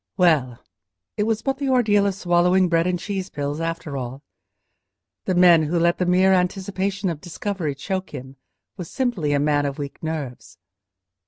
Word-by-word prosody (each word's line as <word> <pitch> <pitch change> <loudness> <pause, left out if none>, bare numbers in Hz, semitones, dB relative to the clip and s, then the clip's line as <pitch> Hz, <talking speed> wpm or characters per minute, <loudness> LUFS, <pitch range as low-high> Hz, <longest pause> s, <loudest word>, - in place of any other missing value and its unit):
Well! 150 - +3 0.6
it 210 - 0
was 225 -1 -1
but 270 0 -1
the 280 -2 -1
ordeal 210 -6 +3
of 195 - -1
swallowing 180 0 +2
bread 165 +1 +2
and 180 -1 0
cheese 195 +1 -4
pills 145 0 -4
after 165 -3 -4
all. 130 +2 -6 1.0
The 185 - 0
man 175 -2 +6
who 155 +3 -1
let 170 +1 +2
the 180 - 0
mere 185 +2 +4
anticipation 190 +2 -1
of 155 -3 -7
discovery 175 -4 -4
choke 190 +6 -4
him 130 +1 -9 0.4
was 180 -4 -7
simply 240 - -1
a 145 - +2
man 145 0 +1
of 140 - -5
weak 140 -2 -7
nerves. 145 -11 -6
175 Hz, 170 wpm, -22 LUFS, 150-190 Hz, 1.0 s, man